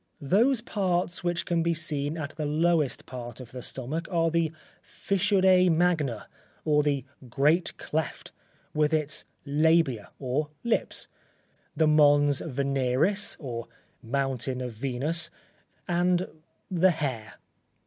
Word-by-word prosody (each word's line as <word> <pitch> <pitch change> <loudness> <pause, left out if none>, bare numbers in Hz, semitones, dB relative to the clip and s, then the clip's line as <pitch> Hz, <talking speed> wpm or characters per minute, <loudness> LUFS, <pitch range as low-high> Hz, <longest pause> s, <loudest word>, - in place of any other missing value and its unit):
Those 230 - +3
parts 180 -6 -1
which 175 -1 -1
can 170 -1 +1
be 170 0 +1
seen 150 -1 -3
at 155 -2 -4
the 155 -1 -4
lowest 155 -3 +1
part 120 -2 -8
of 125 -2 -10
the 125 - -7
stomach 140 +8 -4
are 165 -3 +1
the 165 -1 +1 0.3
fissure 190 -1 +3
magna, 160 -9 +1 0.4
or 150 -1 +4
the 140 -3 0 0.2
great 150 +8 +2
cleft, 155 -1 -4 0.4
with 150 +1 +2
its 150 -1 0 0.2
labia 150 -5 +2
or 140 +3 -2
lips, 235 - 0 0.7
the 160 - +4
Mons 145 -2 +4
Veneris, 140 +7 0
or 120 -5 -5 0.3
Mountain 130 0 -2
of 125 -1 -4
Venus, 135 +8 0 0.6
and 175 +1 +1 0.4
the 185 +1 +4
hair. 130 -10 -3
155 Hz, 120 wpm, -27 LUFS, 135-170 Hz, 0.7 s, or